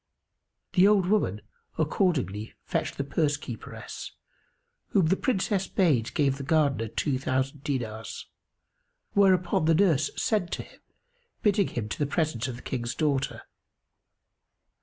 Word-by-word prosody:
The 185 +1 +6
old 205 -3 +4
woman 180 - +1 0.4
accordingly 150 - 0
fetched - - -2
the 140 - -1
purse 145 +1 +1
keeperess, 120 -7 -8 0.7
whom 190 -4 +3
the 175 +4 +3
Princess 195 -5 0
bade 145 - +1
give 135 -2 +2
the 140 - -6
Gardener 140 -6 +2
two 130 +4 -1
thousand 130 +2 -1
dinars; 115 -6 -4 0.9
whereupon 185 -3 +3
the 165 0 +4
nurse 155 -6 +3
sent 205 -6 +1
to - - -3
him, - - -18 0.6
bidding 205 -1 +3
him 110 -3 -4
to - - -5
the 145 - +1
presence 150 -8 0
of 125 - -4
the 120 - -11
King's 120 -2 -3
daughter. 140 -2 0
150 Hz, 135 wpm, -27 LUFS, 130-185 Hz, 0.9 s, The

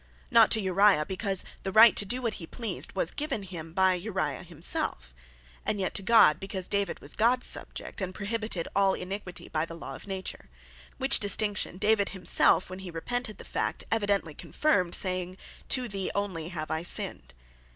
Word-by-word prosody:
Not 230 -2 +7
to 220 - +5
Uriah, 190 -4 +3
because 190 +1 -1 0.2
the 195 - -4
right 220 +2 +8
to 205 - +3
doe 250 +5 -1
what 230 -3 -1
he 165 - -7
pleased, 230 +3 -4
was - - -1
given 295 -8 -3
him 170 -4 -8
by 190 +2 +3
Uriah 180 -6 -3
himself; 155 - -3 0.5
And 205 - -1
yet 190 - -2
to - - +2
God, 195 -8 +5
because 195 -1 -4
David 200 -2 -1
was 145 - -6
Gods 245 +3 +2
Subject; - - -2
and 185 -1 -2
prohibited 210 -2 -3
all 195 -1 +3
Iniquitie 185 -1 -7
by 155 -1 0
the 165 0 -7
law 165 - -8
of - - -11
Nature. 190 -1 -6 0.5
Which 270 0 +5
distinction, 205 -2 +1
David 205 0 +2
himself, 185 -1 +3
when 185 +1 -8
he 190 -1 -8
repented 215 +7 -4
the - - -11
fact, - - -2
evidently 205 -7 0
confirmed, 185 - 0
saying, 185 0 -2 0.3
"To 255 -2 +3
thee 195 -3 -4
only 185 -5 -3
have 155 -4 -5
I 160 0 -1
sinned." - - -1
195 Hz, 180 wpm, -28 LUFS, 175-215 Hz, 0.5 s, right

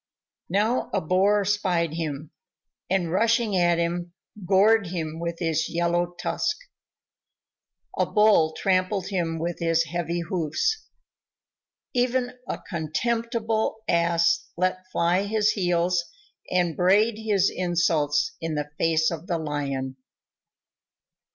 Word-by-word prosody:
Now 210 +7 +1
a - - +3
Boar 195 +5 +2
spied 180 -5 0
him, 155 -2 -4 0.6
and 180 -3 0
rushing 225 +2 +2
at 175 -1 +3
him, 175 +1 -2 0.3
gored 200 +2 +4
him 165 -2 -4
with 170 0 -3
his 165 -2 -1
yellow 175 +1 0
tusk. 340 0 -1 1.4
A - - +1
Bull 210 -7 +4
trampled 185 0 0
him 170 -4 -1
with 170 +1 -3
his 165 -1 +2
heavy 170 +1 -3
hoofs. 175 - -1 1.1
Even 250 0 +1 0.2
a - - -3
contemptible 220 - -1
Ass 170 0 +2
let 185 +1 -1
fly 180 +3 +1
his 215 0 +2
heels 175 -2 +1 0.5
and 175 -3 +1
brayed 210 +5 +3
his 205 -3 +2
insults 165 -5 +1
in 165 -1 -2
the 150 0 -3
face 160 0 +2
of 165 +1 -6
the 175 -4 0
Lion. 140 -4 -3
175 Hz, 115 wpm, -25 LUFS, 165-205 Hz, 1.4 s, gored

